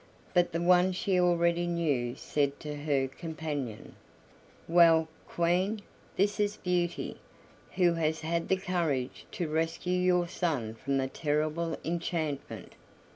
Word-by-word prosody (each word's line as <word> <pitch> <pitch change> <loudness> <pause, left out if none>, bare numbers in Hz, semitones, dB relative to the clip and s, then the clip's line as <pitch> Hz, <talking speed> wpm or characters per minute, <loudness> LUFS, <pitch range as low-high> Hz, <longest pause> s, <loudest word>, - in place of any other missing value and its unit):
But 175 -1 +3
the 165 - -1
one 180 +1 +5
she 185 0 +1
already 175 -1 +2
knew 145 -8 0
said 140 -1 -1
to 150 -1 -5
her 145 -2 0
companion: 145 -6 -5 0.7
"Well, 165 -1 +6 0.2
Queen, 185 +5 0 0.3
this 205 +2 +1
is 205 0 +1
Beauty, 175 -1 -1 0.6
who 175 -2 +4
has 160 -1 0
had 165 +1 -1
the 190 - +2
courage 170 -9 -2
to 175 - -2
rescue 165 +3 -1
your 180 -1 +3
son 145 -11 -2
from 135 +4 -2
the 135 0 0
terrible 155 +3 -1
enchantment. 165 -3 -3
170 Hz, 130 wpm, -30 LUFS, 150-180 Hz, 0.7 s, Well